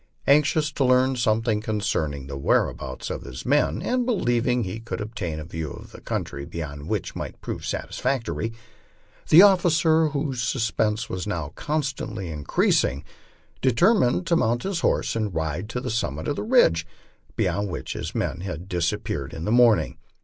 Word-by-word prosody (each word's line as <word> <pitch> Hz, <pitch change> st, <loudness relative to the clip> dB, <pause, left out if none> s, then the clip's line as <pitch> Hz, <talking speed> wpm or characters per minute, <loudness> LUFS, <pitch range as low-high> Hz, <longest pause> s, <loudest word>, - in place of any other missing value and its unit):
Anxious 150 Hz, +1 st, +3 dB
to 140 Hz, -, 0 dB
learn 130 Hz, +1 st, +4 dB
something 110 Hz, -2 st, +1 dB
concerning 80 Hz, -11 st, -2 dB
the 70 Hz, 0 st, -6 dB
whereabouts 70 Hz, -1 st, -1 dB
of -, -, -4 dB
his 60 Hz, 0 st, -8 dB
men, 80 Hz, -, +2 dB
and 250 Hz, 0 st, +1 dB
believing 125 Hz, -, +1 dB
he 95 Hz, +3 st, -4 dB
could 115 Hz, 0 st, -5 dB
obtain 100 Hz, -7 st, -4 dB
a 75 Hz, -, -6 dB
view 80 Hz, -2 st, -5 dB
of -, -, -10 dB
the -, -, -12 dB
country 70 Hz, -, -4 dB
beyond 75 Hz, -1 st, -6 dB
which -, -, -2 dB
might -, -, -6 dB
prove -, -, -5 dB
satisfactory, 125 Hz, -3 st, -2 dB, 0.8 s
the 170 Hz, +5 st, +9 dB
officer, 165 Hz, -4 st, +4 dB
whose 140 Hz, -4 st, -2 dB
suspense 115 Hz, -2 st, 0 dB
Avas 85 Hz, -6 st, -4 dB
constantly 135 Hz, -, -3 dB
increasing, 70 Hz, -2 st, +1 dB, 0.6 s
determined 170 Hz, -, +3 dB
to 170 Hz, -, +2 dB
mount 120 Hz, -6 st, +1 dB
his 195 Hz, -3 st, -1 dB
horse -, -, +1 dB
and 105 Hz, -6 st, -2 dB
ride 80 Hz, +5 st, -2 dB
to 125 Hz, -, -3 dB
the 125 Hz, -1 st, -4 dB
summit 80 Hz, -10 st, -2 dB
of 145 Hz, -, 0 dB
the -, -, -3 dB
ridge 210 Hz, -, +4 dB, 0.5 s
beyond 100 Hz, 0 st, 0 dB
which -, -, -5 dB
his -, -, -5 dB
men -, -, -1 dB
had 90 Hz, -2 st, -6 dB
disap 85 Hz, -4 st, -1 dB
peared -, -, -4 dB
in 80 Hz, -, -5 dB
the 105 Hz, -, 0 dB
morning. 120 Hz, -3 st, +4 dB
115 Hz, 165 wpm, -24 LUFS, 85-140 Hz, 0.8 s, the